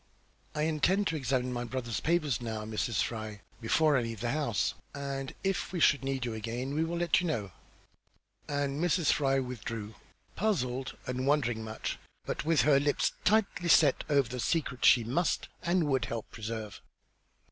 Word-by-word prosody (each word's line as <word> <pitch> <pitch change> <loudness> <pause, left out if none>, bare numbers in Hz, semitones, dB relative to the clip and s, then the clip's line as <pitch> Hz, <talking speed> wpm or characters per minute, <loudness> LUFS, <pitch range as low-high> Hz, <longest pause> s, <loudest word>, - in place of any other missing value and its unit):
"I 150 - 0
intend 160 +6 +2
to 165 - -2
examine 130 -3 0
my 120 0 -2
brother's 120 -2 -3
papers 155 -8 +1
now, 110 -2 -4
Mrs. 110 -1 0
Fry, 110 -3 -5 0.2
before 150 +6 +3
I 130 - +3
leave 115 -2 -4
the 120 0 0
house, 140 -8 0 0.2
and 140 -1 -4
if 195 -2 -1
we 180 - -2
should 145 -3 +4
need 135 -2 -1
you 120 - -3
again 120 +5 -4
we 155 +2 +1
will 170 +1 -2
let 170 0 +3
you 180 - -1
know." 105 - -2 1.0
And 145 +1 -1
Mrs. 175 -2 +3
Fry 135 -2 +2
withdrew, 115 -4 -4 0.4
puzzled 130 - -1
and 125 +1 -2
wondering 120 -6 +1
much, 110 0 -4 0.3
but 150 - -3
with 160 0 +3
her 145 -2 +5
lips 145 0 +1
tightly 205 -5 +2
set 150 -4 +5
over 140 -4 +3
the 125 0 -5
secret 140 -2 0
she 120 - +7
must 135 +10 0
and 175 0 +2
would 135 -4 +1
help 115 -2 -4
to - - -27
preserve. 110 -2 -5
135 Hz, 175 wpm, -30 LUFS, 115-155 Hz, 1.0 s, she